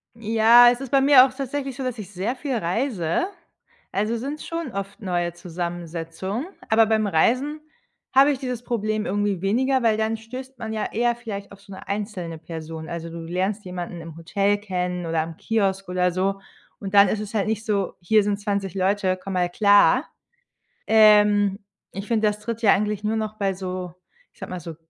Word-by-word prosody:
Ja, 230 +2 +6
es 245 +2 -4
ist 270 - -6
bei 275 - +4
mir 270 -2 +8
auch 265 - -5
tatsächlich 275 0 -4
so, 270 - -5
dass 250 -2 -3
ich 200 -2 -8
sehr 205 +6 -2
viel 270 -1 -3
reise. 205 - -1 0.6
Also, 215 +4 -1
sind 280 +6 -5
schon 330 -5 -5
oft 200 +3 -6
neue 175 -3 -1
Zusammensetzungen, 175 - -5 0.2
aber 225 0 +5
beim 220 -1 +1
Reisen 255 - +1 0.5
habe 275 +2 +6
ich 270 - -3
dieses 250 -3 -4
Problem 215 -3 -1
irgendwie 205 -2 -1
weniger, 255 +6 +1
weil 220 -2 +3
dann 220 +1 0
stößt 255 +4 -9
man 220 0 -5
ja 215 -1 -2
eher 240 +1 +1
vielleicht 210 -4 -7
auf 200 0 -14
so 200 0 -12
'ne 190 - -11
einzelne 200 -5 -4
Person. 160 0 -7
Also, 170 -1 -5
du 170 0 -8
lernst 185 +5 -2
jemanden 175 -1 -6
im 165 -1 -10
Hotel 200 +5 +1
kennen 180 -3 -3
oder 165 -1 0
am 165 0 -6
Kiosk 195 -4 -1
oder 180 0 +1
so. 195 +2 -1 0.4
Und 195 0 -6
dann 200 0 +8
ist 215 - -1
es 210 0 -6
halt 205 -1 +1
nicht 220 0 -2
so: 200 -3 -1
„Hier 210 +4 +3
sind 205 0 -1
20 200 -3 -2
Leute, 190 0 +1
komm 195 - -5
mal 180 -1 +1
klar.“ 205 - +4 0.8
Ähm, 210 -2 +5 0.3
ich 195 +2 -7
finde, 220 -2 +2
das 210 0 -1
tritt 230 +1 -5
ja 215 - +6
eigentlich 210 0 -1
nur 215 +1 0
noch 215 -1 -4
bei 195 -1 0
so, 185 -2 -5 0.4
ich - - -27
sage - - -7
mal 180 - -4
so 165 -1 -8
205 Hz, 195 wpm, -23 LUFS, 185-230 Hz, 0.8 s, mir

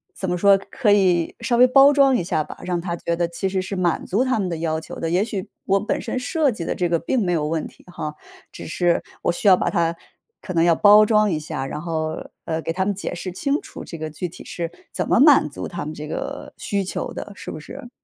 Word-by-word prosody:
怎 190 - -3
么 180 - 0
说， 200 +1 +6
可 235 -6 +1
以， 180 -5 +3
稍 235 +1 0
微 250 - +8
包 275 +2 +7
装 275 -2 +4
一 230 - 0
下 165 -4 0
吧， - - -10
让 180 -1 -1
他 170 0 -3
觉 170 0 -2
得 170 0 0
其 170 +3 -3
实 190 -1 -1
是 195 +1 -5
满 175 -3 0
足 215 +7 +1
他 255 -4 0
们 190 - -1
的 165 - -3
要 160 -1 -1
求 160 - -9
的。 165 - -2
也 180 +4 +2
许， 205 -4 -5 0.2
我 195 +1 +3
本 210 - -2
身 255 - -3
设 295 +2 +1
计 210 -7 -5
的 - - -2
这 180 - 0
个 170 -1 +2
并 230 +6 0
没 175 - +1
有 150 -2 0
问 160 0 -1
题 - - -19
哈， 155 -4 -5 0.4
只 - - -9
是 175 +1 +1 0.2
我 - - +2
需 200 - -2
要 185 -2 +8
把 - - 0
它 170 -2 +1 0.5
可 185 - -6
能 165 -1 +3
要 170 -1 +4
包 210 +4 +7
装 210 -2 +3
一 155 - 0
下， 140 -3 -4
然 150 +3 -5
后， 160 -2 -3 0.2
呃， 160 0 -2
给 165 - -3
他 190 +1 0
们 205 - 0
解 195 -2 -5
释 180 +1 -5
清 280 - -1
楚 - - -10
这 165 - -8
个 155 0 -5
具 175 +3 -4
体 165 - -12
是 170 -1 -4 0.2
怎 - - -2
么 - - +4
满 280 - +6
足 - - -6
他 - - -5
们 155 - -5
这 150 0 -7
个 - - -5
需 200 -1 -1
求 185 - -4
的， - - -7
是 - - -8
不 - - -7
是？ 240 +9 -10
180 Hz, 285 characters per minute, -22 LUFS, 165-210 Hz, 0.5 s, 微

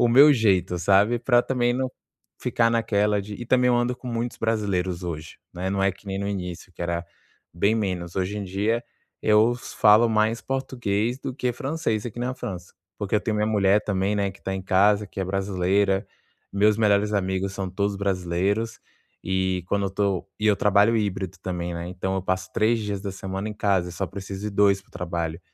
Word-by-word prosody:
o 120 - +5
meu 140 +5 +8
jeito, 95 - +2
sabe, 100 +6 +3
pra 120 0 +3
também 120 -2 +1
não 130 +1 -1 0.5
ficar 115 -1 +2
naquela 105 -3 +1
de 105 +1 -7
e 120 - -7
também 125 +1 +3
eu 120 - +4
ando 120 +1 0
com 125 - -11
muitos 120 0 -3
brasileiros 95 -5 -1
hoje, 80 -3 -6
né. 90 +2 -3
Não 100 0 0
é 95 - +4
que 100 +2 -16
nem 95 0 -3
no 100 0 -2
início, 90 -1 -5
que - - -17
era 85 0 -2 0.5
bem 100 +6 +2
menos. 90 -5 -2
Hoje 95 +2 -1
em 100 - -4
dia 105 +5 -1 0.4
eu 110 +3 +4
falo 110 -1 +4
mais 110 +1 +1
português 120 -3 -2
do 130 - -5
que 125 -2 -1
francês 130 -5 -2
aqui 120 +1 -7
na 125 +1 -1
França. 90 -6 -7 0.2
Porque 100 -1 -3
eu - - +1
tenho 110 -1 -1
minha 105 - +1
mulher 100 -1 +3
também, 100 0 0
né, 100 -1 0
que 95 - -17
tá 95 - -3
em 95 - -4
casa, 100 +2 +3
que 100 - -11
é 95 - 0
brasileira. 95 +1 +1 0.5
Meus 105 +1 +3
melhores 105 -1 +3
amigos, 95 -1 -1
são 95 -1 -4
todos 100 +2 -1
brasileiros. 100 +4 -1 0.5
E 95 -1 0
quando 100 0 +1
eu - - -3
tô 100 -2 -1
e 105 - 0
eu 105 - +5
trabalho 105 +3 +4
híbrido 95 -3 -2
também, 90 -2 -3
né, 85 +1 -5
então 90 +1 -3
eu 95 - -1
passo 95 0 -2
3 115 +2 +2
dias 105 -2 -3
da 100 - -3
semana 95 +2 -5
em - - -4
casa, 100 -4 +1
eu - - -8
só 95 +2 -3
preciso 95 +3 -6
ir - - -3
2 100 -1 +3
para 100 - -29
o - - -26
trabalho. 85 -1 -3
100 Hz, 210 wpm, -25 LUFS, 95-110 Hz, 0.5 s, meu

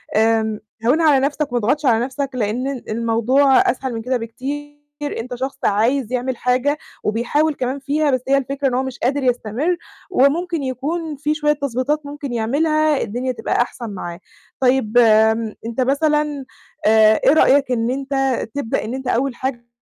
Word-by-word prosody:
آمم، 220 -1 +2 0.3
هوّنها 315 +6 +4
على 270 - +4
نَفسك 290 -1 -2
وما 245 - +1
تضغطش 285 +8 0
على 235 -1 +3
نَفسك 275 +1 -3
لأن 240 +2 -1
ال 275 -3 -6
الموضوع 235 +5 +2 0.2
أسهل 260 0 -5
من 225 - -4
كده 255 +2 0
بكتير، 290 +5 -6
أنت 250 +2 -5
شخص 265 +2 -4
عايز 235 +4 +1
يعمل 250 0 -1
حاجة 255 +4 +1 0.3
وبيحاول 290 +8 +1
كمان 260 +2 -2
فيها 290 +2 0
بس 255 - +1
هي 275 - +4
الفكرة 275 +1 -1
إن 255 - -1
هو 255 +1 +1
مش 265 -2 -6
قادر 270 +3 0
يستمر، 250 - 0 0.3
وممكن 330 +2 +2
يكون 295 +5 -3
في 295 +2 -1
شوية 300 -1 +1
تضبيطات 280 +2 -2
ممكن 285 -2 -6
يعملها 300 +6 +1
الدنيا 245 +5 -2
تبقى 235 0 -1
أحسن 240 -1 -4
معاه. 175 -3 -6 0.4
طيب 250 -3 +2
آمم، 220 -1 +4
أنت 230 +3 -2
مثلًا 295 +1 +1 0.4
آآ، 220 0 +5
إيه - - +6
رأيك 280 -3 +4
إن 230 -1 0
أنت 270 -1 -1 0.2
تبدأ 280 -6 -2
إن 225 - -4
أنت 265 0 -5
أول 250 +1 0
حاجة 245 -2 -4
260 Hz, 170 wpm, -20 LUFS, 235-285 Hz, 0.4 s, إيه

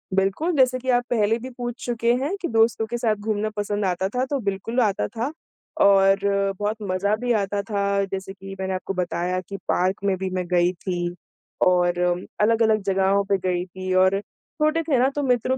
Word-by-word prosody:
बिल्कुल, 195 - +1
जैसे 255 -2 +3
कि 260 +1 -5
आप 245 0 +3
पहले 225 -2 +2
भी 255 +3 -7
पूछ 240 +1 -5
चुके 235 -1 +1
हैं 300 +8 -1
कि 350 - -1
दोस्तों 225 0 +3
के 240 - -3
साथ 225 -3 +1
घूमना 215 0 -2
पसंद 205 0 -1
आता 185 0 0
था 250 +3 -1
तो, 275 +1 -2
बिल्कुल 205 +4 -2
आता 205 -3 +1
था। 235 +7 -3 0.5
और 195 0 +5 0.4
बहुत 210 +1 -1
मज़ा 200 +3 +1
भी 245 +2 -2
आता 200 +1 -2
था 200 -2 0 0.2
जैसे 190 0 -5
कि 195 0 -9
मैंने 190 0 -2
आपको 185 +1 -3
बताया 180 0 -1
कि 195 +2 -8
पार्क 190 +2 0
में 195 -1 +2
भी 190 0 -3
मैं 185 -1 -2
गई 175 0 +3
थी 175 -1 -3 0.5
और 175 -1 +2 0.4
अलग-अलग 220 0 +3
जगहों 195 +1 +2
पे 195 0 +2
गयी 180 0 0
थी 185 0 -5
और 185 +1 +4
छोटे 310 +9 -2
थे 300 -5 +1
ना 255 - +4
तो 290 - -1
मित्रों 255 0 +1
200 Hz, 195 wpm, -23 LUFS, 190-240 Hz, 0.5 s, और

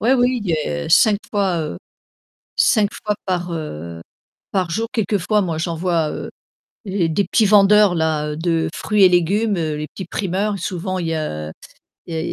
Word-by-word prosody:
Oui, 235 - +2
oui, 250 -1 +2
il 185 - -1 0.4
y - - -6
5 210 -2 +5
fois, 195 -4 +1
heu, 150 - -5 0.8
5 210 -4 +4
fois 210 0 0
par, 180 -2 -2
heu, 85 - -6 0.5
par 185 -3 0
jour. 225 +7 -1
Quelquefois, 210 -2 +1
moi, 170 -4 -2
j'en 165 +1 -2
vois, 165 -2 0
heu, - - -6 0.6
et 185 -4 0
des 195 +5 +1
petits 220 - +2
vendeurs-là, 195 -7 +4
heu, - - -5
de 165 0 0
fruits 210 -2 +2
et 185 - +8
légumes, 195 +5 +2
heu, 155 -2 -2
les 150 0 -4
petits 190 - -8
primeurs, 195 +3 -2
souvent, 185 +1 -3
il 170 -2 -2
y 165 - -1
a 75 - -4 0.5
il 165 - -6
y 160 - -1
180 Hz, 180 wpm, -20 LUFS, 160-205 Hz, 0.8 s, et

